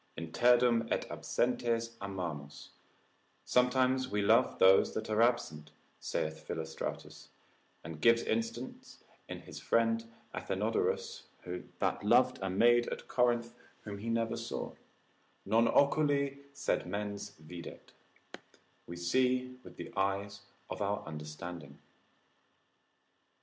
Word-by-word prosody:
Interdum 120 +7 +3
et - - 0
absentes 115 -1 -1
amamus, 85 -8 -5 0.8
sometimes 130 +1 +3
we 105 -3 -1
love 115 +5 +4
those 95 +1 +5
that 110 0 -3
are 110 +1 +3
absent, 80 -11 +1 0.3
saith 80 0 -3
Philostratus, 80 0 -5 0.6
and 80 -1 -8
gives 115 +5 +5
instance 115 +3 -4 0.3
in - - -6
his - - -10
friend 115 0 +1 0.3
Athenodorus, - - -1 0.5
that - - -1
loved 125 +4 +4
a 95 - -1
maid 120 +5 +4
at - - -5
Corinth 120 -1 +1 0.3
whom 100 -1 -6
he 115 +3 -4
never 115 0 0
saw; 115 0 -5 0.7
non 115 +3 +4
oculi 140 0 +2
sed 140 - -1
mens 100 +2 -4
videt, 85 +2 -10 1.0
we 85 - -6
see 125 +8 +1
with - - -12
the - - -8
eyes 100 +1 -1 0.3
of - - -6
our 100 0 -1
understanding. 75 0 -8
115 Hz, 110 wpm, -32 LUFS, 90-120 Hz, 1.0 s, those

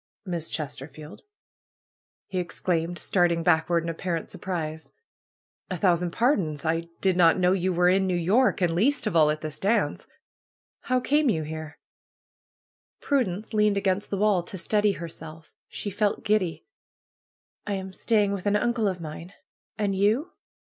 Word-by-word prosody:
^'Miss 170 -3 -3
Chesterfield!'' 150 +1 -7 1.0
he 185 - -3
exclaimed, 175 -1 -2
starting 175 -3 +1
back 160 -1 +3
ward 170 -1 +2
in 170 - -3
apparent 165 0 -3
surprise. 160 -4 -5 0.8
A 185 - -3
thousand 175 -1 +2
pardons! 170 - 0
I 165 +1 0
did 190 -2 +2
not 170 -1 +5
know 180 -1 +3
you 185 0 +1
were 180 0 +3
in 190 +1 +3
New 180 -1 +1
York, 200 +7 +2
and 175 -2 +2
least 255 +11 +2
of 215 - -1
all 155 -2 +5
at 155 0 -1
this 155 -1 -6
dance 215 +4 0 0.8
How 255 0 +3
came 295 +1 +2
you 160 -8 0
here?" 155 0 -7 1.2
Prudence 220 -6 -1
leaned 210 -1 +3
against 195 0 0
the 200 - -2
wall 205 -2 +3
to 185 +3 -7
steady 210 +3 +1
herself. 160 -2 -9 0.2
She 205 - -5
felt 205 +1 0
giddy. 205 -5 0 1.0
am 190 -2 -3
staying 210 -1 +1
with 200 0 -3
an 205 - +3
uncle 230 0 +1
of 185 -3 -2
mine. 165 +4 -8 0.4
And 205 -2 0
you?" 215 - +1
180 Hz, 155 wpm, -26 LUFS, 165-205 Hz, 1.2 s, not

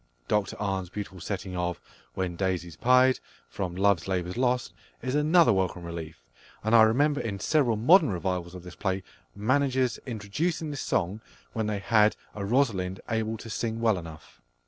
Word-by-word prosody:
Dr 105 -2 0
Arne's 95 -3 -2
beautiful 100 -1 -7
setting 95 0 -5
of 90 0 -2 0.4
"When 90 -2 -2
daisies 90 -3 -2
pied," 130 +5 +4 0.3
from 90 +8 -4
Love's 95 -2 +2
Labour's 90 -1 -2
Lost, 125 0 0 0.3
is 130 - -2
another 155 0 +5
welcome 95 -2 -1
relief, 80 -6 -7 0.4
and 110 +2 0
I 115 - +9
remember 140 +7 +3
in 100 -4 -4
several 130 -3 +2
modern 155 - +6
revivals 90 -1 -3
of 90 - -9
this 90 -1 -10
play 95 -1 -2 0.3
managers 130 +3 +1
introducing 145 - -2
this 145 - -4
song 95 +6 -1 0.3
when 110 -1 -1
they 105 -1 -1
had 105 +1 +3 0.2
a 100 - -5
Rosalind 100 -6 +1
able 110 0 -1
to 115 - -10
sing 115 +1 -2
well 110 -5 +2
enough. 80 -7 -12
105 Hz, 165 wpm, -27 LUFS, 90-125 Hz, 0.4 s, I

